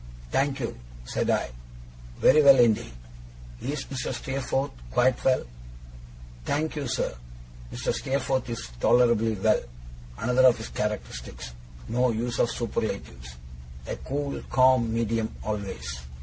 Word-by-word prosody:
'Thank 135 0 +1
you,' - - -4 0.3
said - - -1
I, - - +1 0.7
'very 155 +3 +6
well 140 -2 +8
indeed. 115 - +3 0.7
Is 140 +1 -3
Mr. 135 -2 -4
Steerforth 135 +1 -2 0.2
quite 125 - +2
well?' 130 -1 +3 1.0
'Thank 155 - -1
you, 145 -3 -3
sir, - - -1 0.6
Mr. - - -2
Steerforth 130 -1 -1
is 115 - -4
tolerably 115 - +4
well.' 110 +2 +2 0.6
Another 125 - +4
of 125 - +4
his 110 - -7
characteristics 65 - -4 0.4
no 125 +2 +2
use 120 +1 -2
of 120 - +3
superlatives. 60 - -4 0.5
A - - -4
cool 140 +1 -3
calm 130 -3 +4
medium 115 -1 -1
always. 95 -11 -4
120 Hz, 120 wpm, -26 LUFS, 105-135 Hz, 1.0 s, well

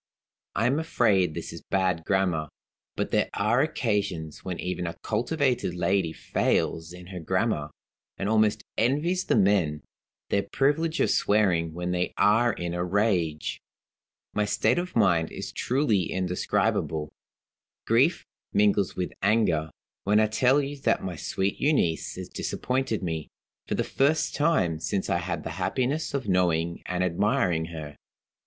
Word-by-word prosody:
I 110 - +1
am 135 +5 +2
afraid 105 - +2
this - - -5
is - - -8
bad 95 -4 0
grammar. 90 -6 +1 0.5
But - - -2
there - - +2
are 110 +5 +2
occasions 100 - -2
when 90 -2 -4
even 90 -1 -3
a 85 0 -6
cultivated 125 - 0
lady 90 -1 +1
fails 80 +1 -1
in 90 0 -10
her 90 - -5
grammar, 95 -3 0 0.5
and 95 - -2
almost 110 -1 +2 0.2
envies 155 +10 +1
the - - +2
men 95 - +2 0.5
their 100 - +3
privilege 155 - 0
of - - +3
swearing 90 -6 +2
when 90 +1 -2
they 90 0 -1
are 115 +3 +4
in 85 -4 -4
a 90 0 -1
rage. 90 -5 0 0.7
My 105 - +1
state 110 +6 +2
of 180 +1 -5
mind 90 -7 +3
is - - -6
truly 120 - +1
indescribable. 90 -4 -1 0.7
Grief - - +3 0.3
mingles 100 -2 +2
with 90 -1 -3
anger, 95 -7 +2 0.3
when 105 +2 +3
I 110 - +5
tell 125 +6 +3
you 140 +1 -5
that - - +1
my 90 -2 -4
sweet 95 +5 -2
Euneece 135 - +1
has - - -6
disappointed 125 -5 -2
me, 80 -3 -3 0.4
for - - -1
the - - 0
first 145 +4 +1
time 120 - +1
since 95 +4 -2
I 85 - +2
had 85 +1 -4
the - - -5
happiness 140 +4 -1
of 130 -5 -3
knowing 85 -3 +1
and 90 0 0
admiring 90 -2 +1
her. 80 -3 -8
95 Hz, 150 wpm, -27 LUFS, 85-120 Hz, 0.7 s, I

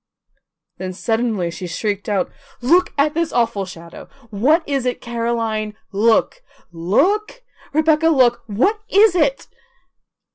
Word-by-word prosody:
Then 185 0 -5
suddenly 220 -3 -1
she 180 +2 -7
shrieked 205 +3 -3
out: 195 -3 -1 0.3
"Look 345 +9 +3
at 295 +1 +2
this 330 0 -1
awful 230 -5 0
shadow! 170 -2 -11 0.2
What 290 - +2
is 275 -3 -1
it? 250 - -2
Caroline, 230 -2 -2 0.2
look, 225 - +2 0.3
look! 370 - 0 0.3
Rebecca, 315 +1 +2
look! 255 -6 +3
WHAT 260 - +1
IS 415 -1 +5
IT?" 290 -6 +1
235 Hz, 120 wpm, -19 LUFS, 205-315 Hz, 0.3 s, IS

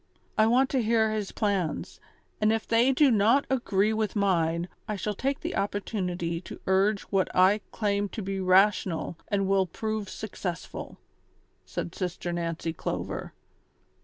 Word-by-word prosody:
I 215 - +4
want 260 +3 +3
to 265 - +2
hear 220 -1 +2
his 215 -2 -2
plans, 200 -6 -1 0.4
and 215 0 +4
if 225 0 -1
they 235 +3 +4
do 270 0 +4
not 225 +6 +4
agree 220 -5 +2
with 215 -2 -1
mine, 170 -4 +1 0.2
I 215 - -2
shall 210 +1 -2
take 270 +6 -2
the - - -3
opportunity 180 -4 -2
to - - -9
urge 195 +2 +3
what 195 -2 +2
I 190 +3 +5
claim 205 -1 0
to 215 - -2
be 195 0 -3
rational 185 -2 +3
and 195 -2 0
will 195 -1 +3
prove 215 +2 -3
successful," 185 -5 -6 0.7
said 170 - -4
Sister 175 -1 -3
Nancy 165 -1 -2
Clover. - - -4
200 Hz, 150 wpm, -28 LUFS, 185-220 Hz, 0.7 s, I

